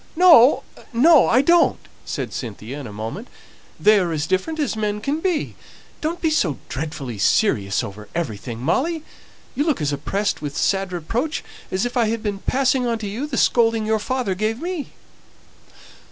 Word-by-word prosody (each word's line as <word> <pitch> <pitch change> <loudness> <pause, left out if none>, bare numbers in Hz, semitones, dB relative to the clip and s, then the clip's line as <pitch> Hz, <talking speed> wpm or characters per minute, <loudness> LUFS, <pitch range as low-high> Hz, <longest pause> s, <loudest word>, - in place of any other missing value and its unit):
"No, 320 -7 +7 0.3
no, 280 +5 +6
I 255 +4 +4
don't!" 340 +3 +4 0.3
said - - -4
Cynthia 120 +3 -6
in 135 - -7
a - - -9
moment. 110 - -6 0.5
"They 210 0 +5
are 175 -3 -1
as 155 -2 -1
different 190 - -1
as 290 -6 0
men 210 -1 -1
can 280 +8 -2
be. 345 -3 -1 0.5
Don't 330 +3 -2
be 320 -3 +1
so 185 - +1
dreadfully 135 -6 -5
serious 100 - +2
over 105 +1 -8
everything, 120 -7 -4
Molly. 305 - 0 0.5
You 290 - 0
look 305 - 0
as 145 -2 -1
oppressed 195 +9 -2
with 145 -2 -5
sad 195 -1 0
reproach, 230 - -2 0.3
as 190 +4 -1
if 245 +1 -3
I 235 -2 +3
had 225 0 -2
been 205 -2 -2
passing 260 +1 +1
on 230 -1 0
to 215 -2 -5
you 230 +9 -4
the 265 -4 -4
scolding 225 -2 +3
your 220 0 +1
father 250 -3 -1
gave 215 +4 -2
me." 345 -2 -5
215 Hz, 175 wpm, -21 LUFS, -, 0.5 s, No